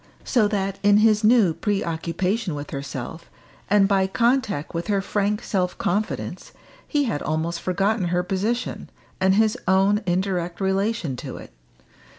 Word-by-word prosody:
So 230 -5 +2
that 195 -2 -2
in 205 0 +5
his 215 0 +4
new 215 -6 +5
preoccupation 180 0 -1
with 145 0 -7
herself, 140 +3 -6 0.4
and 200 -1 +5
by 195 -1 +2
contact 230 - 0
with 170 0 -3
her 205 -2 +1
frank 205 +2 -1
self 180 -3 -1
confidence, 210 +4 -3 0.3
he 295 -2 +1
had 220 - -2
almost 165 +2 -2
forgotten 195 +2 0
her 175 +1 0
position, 205 +7 -2 0.3
and 190 0 +3
his 220 0 +3
own 195 +3 +3
indirect 180 -1 -1
relation 195 - 0
to - - -7
it. - - -12
195 Hz, 145 wpm, -23 LUFS, 175-210 Hz, 0.4 s, in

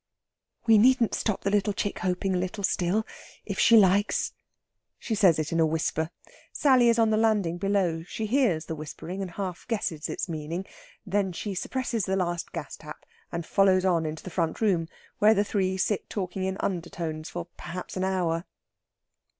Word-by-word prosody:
"We 225 -2 +6
needn't 245 0 +4
stop 215 -3 -1
the 205 +1 +1
chick 205 - -2
hoping 185 +1 -1
a 180 - +1
little 185 +3 -4
still 190 +3 +1 0.4
if 200 -3 -4
she 230 - +7
likes." 200 0 +3 0.6
She 230 - -4
says 190 -6 +5
it 155 -1 -2
in 165 - +1
a 160 - +5
whisper. 160 0 -1 0.4
Sally 255 -5 +4
is 230 - +3
on 225 -1 +4
the 215 - +3
landing 210 -6 +1
below; 190 -4 +1
she 220 +4 -4
hears 215 - +2
the 160 - -4
whispering, 160 +4 -6
and 190 - -3
half 180 0 -5
guesses 190 -10 -2
its - - -3
meaning. 165 +3 -4 0.4
Then 195 -1 0
she 200 +4 -4
suppresses 235 +1 -2
the 190 - 0
last 175 -2 -2
gas - - -6
tap, - - -11 0.3
and 170 -1 -4
follows 190 0 +3
on 170 -4 +2
into 155 +1 -6
the 185 - -7
front 165 -2 -1
room, 185 -7 +2 0.3
where 215 +1 +6
the 205 - +3
three 190 -2 0
sit 195 +1 -1
talking 185 -1 -3
in 190 0 -2
undertones 165 -3 -3
for 175 -1 -5
perhaps 180 +1 -7
an 185 - -1
hour. 180 -3 0
190 Hz, 180 wpm, -27 LUFS, 170-205 Hz, 0.6 s, she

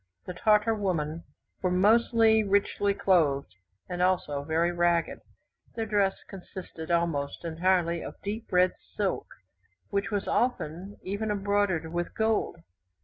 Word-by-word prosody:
The 180 - -5
Tartar 210 +4 +3
women 170 -6 -2 0.4
were 185 - +1
mostly 220 +3 +4
richly 200 0 +1
clothed, 150 - +2 0.3
and 180 -1 -4
also 180 -6 +1
very 165 +3 +1
ragged. 175 -1 +1 0.6
Their 225 - -2
dress 205 -2 +2
consisted 180 -4 -9
almost 170 -3 -1
entirely 170 0 +1
of - - -8
deep 215 +3 -5
red 180 0 +4 0.2
silk, 200 -2 -1 0.6
which 200 0 0
was 205 -2 -2
often 195 -6 -1
even 205 +3 -3
embroidered 200 -5 0
with 175 0 -3
gold. 220 -6 0
185 Hz, 125 wpm, -28 LUFS, 170-205 Hz, 0.6 s, mostly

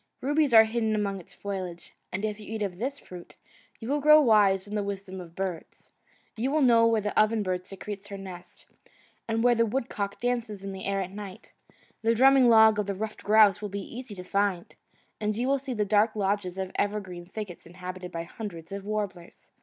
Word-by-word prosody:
Rubies 290 +1 +1
are 225 -1 +9
hidden 220 -1 0
among 200 -2 -1
its 175 - -16
foliage, 185 -4 -6 0.2
and 195 +4 -2
if 210 0 -3
you 210 0 -10
eat 220 -1 -2
of 185 -3 -4
this 270 +5 -2
fruit, 180 -9 -12 0.4
you 225 - -7
will 290 +2 0
grow 305 +1 +8
wise 205 -7 +4
in 205 - -8
the 210 - 0
wisdom 195 -2 -5
of 170 -1 -12
birds. 185 -3 -6 0.4
You 235 +4 -1
will 300 +1 +2
know 230 -2 +6
where 225 -1 +2
the 205 0 -3
oven 215 0 +3
bird 185 -1 -3
secretes 200 +1 -8
her 200 - -7
nest, 180 -2 -11 0.6
and 225 0 0
where 245 0 +5
the 230 -1 +3
wood 235 +2 -2
cock 200 -1 -4
dances 235 -5 -2
in 195 - -5
the 190 0 -7
air 195 0 0
at 185 0 -5
night; 200 -2 -10 0.5
the 230 +1 +2
drumming 265 0 +6
log 220 -2 +6
of 205 - -1
the 200 - -2
ruffed 215 +2 -5
grouse 210 -2 +5
will 210 - -4
be 200 +3 -6
easy 245 -4 -7
to 180 - -8
find, 195 -2 -1 0.5
and 210 0 -1
you 240 +4 -1
will 275 0 +2
see 265 -2 -5
the 210 -1 0
dark 210 +2 +3
lodges 195 -2 -1
of 190 -1 -3
the - - -1
evergreen 190 -4 -4
thickets 195 -4 -8
inhabited 180 +1 -8
by 165 0 -4
hundreds 170 -2 -8
of 200 0 -5
warblers. 200 -4 -5
205 Hz, 215 wpm, -27 LUFS, 190-225 Hz, 0.6 s, are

